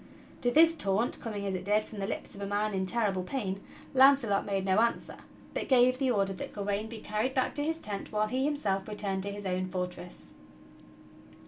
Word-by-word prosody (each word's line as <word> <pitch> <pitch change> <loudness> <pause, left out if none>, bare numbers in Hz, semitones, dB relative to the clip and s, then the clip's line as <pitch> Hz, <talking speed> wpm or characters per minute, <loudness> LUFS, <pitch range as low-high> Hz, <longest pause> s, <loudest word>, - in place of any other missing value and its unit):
To 245 - +2
this 325 +5 +6
taunt, 210 -3 0
coming 210 -4 -4
as 195 - -1
it 185 -1 -3
did 210 +1 +2
from 215 - -9
the 195 - -2
lips - - -5
of 200 - -10
a 200 - -3
man 205 +1 0
in 190 -1 -1
terrible 205 -3 +1
pain, 195 -2 -3 0.3
Launcelot 260 -7 +5
made 195 -1 -1
no 190 +2 +3
answer, 235 +1 0 0.4
but - - -3
gave 255 0 +5
the 270 -2 +2
order 195 -4 +1
that 185 - -7
Gawain 205 +1 -2
be 230 - -7
carried 215 +5 -2
back 260 - +1
to 290 - -2
his 320 +2 -1
tent 205 -10 -5
while 215 -1 +1
he 255 +5 -1
himself 210 -10 0
returned 200 -2 -2
to 200 +1 -3
his 205 0 -7
own 185 0 -1
fort 180 -1 -3
ress. 175 0 -10
210 Hz, 215 wpm, -30 LUFS, 195-245 Hz, 0.4 s, this